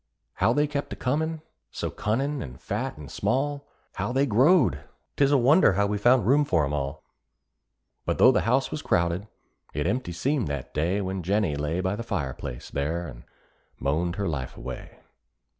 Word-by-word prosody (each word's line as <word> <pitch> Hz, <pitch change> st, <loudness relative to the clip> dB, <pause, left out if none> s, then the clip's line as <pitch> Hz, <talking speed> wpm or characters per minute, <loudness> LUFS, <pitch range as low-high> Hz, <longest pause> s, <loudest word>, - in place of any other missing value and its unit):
How -, -, +3 dB
they 145 Hz, 0 st, +3 dB
kept 145 Hz, -1 st, -4 dB
a -, -, -5 dB
comin', 160 Hz, +4 st, -1 dB, 0.3 s
so -, -, -4 dB
cunnin' 135 Hz, +7 st, -1 dB
and 65 Hz, -1 st, -8 dB
fat -, -, -3 dB
and 75 Hz, -2 st, -10 dB
small! 140 Hz, +2 st, -1 dB, 0.3 s
How -, -, -2 dB
they 135 Hz, +2 st, +2 dB
growed! 140 Hz, -, +4 dB, 0.4 s
'twas 140 Hz, -1 st, +3 dB
a 145 Hz, -, +5 dB
wonder 135 Hz, -, +5 dB
how 100 Hz, +2 st, +2 dB
we 105 Hz, 0 st, -1 dB
found 120 Hz, 0 st, +4 dB
room 140 Hz, +6 st, +4 dB
for 80 Hz, -, +2 dB
'em 70 Hz, -, -3 dB
all; 70 Hz, +1 st, -3 dB, 1.0 s
But -, -, 0 dB
though 130 Hz, -, +7 dB
the -, -, +2 dB
house 130 Hz, +2 st, +2 dB
was 150 Hz, -, -3 dB
crowded, 85 Hz, +3 st, 0 dB, 0.5 s
it 75 Hz, 0 st, -1 dB
empty 125 Hz, -7 st, -1 dB
seemed 130 Hz, -, 0 dB
that 70 Hz, -3 st, -5 dB
day 90 Hz, +7 st, 0 dB
When 95 Hz, 0 st, -3 dB
Jennie 95 Hz, -3 st, +1 dB
lay 75 Hz, +5 st, -1 dB
by 95 Hz, +1 st, 0 dB
the 110 Hz, -, -5 dB
fire 90 Hz, -, -2 dB
place, -, -, -8 dB
there, 80 Hz, +5 st, -2 dB
and -, -, -10 dB, 0.5 s
moaned 85 Hz, +5 st, 0 dB
her 100 Hz, 0 st, -2 dB
life 70 Hz, -6 st, -4 dB
away. -, -, -8 dB
100 Hz, 185 wpm, -26 LUFS, -, 1.0 s, though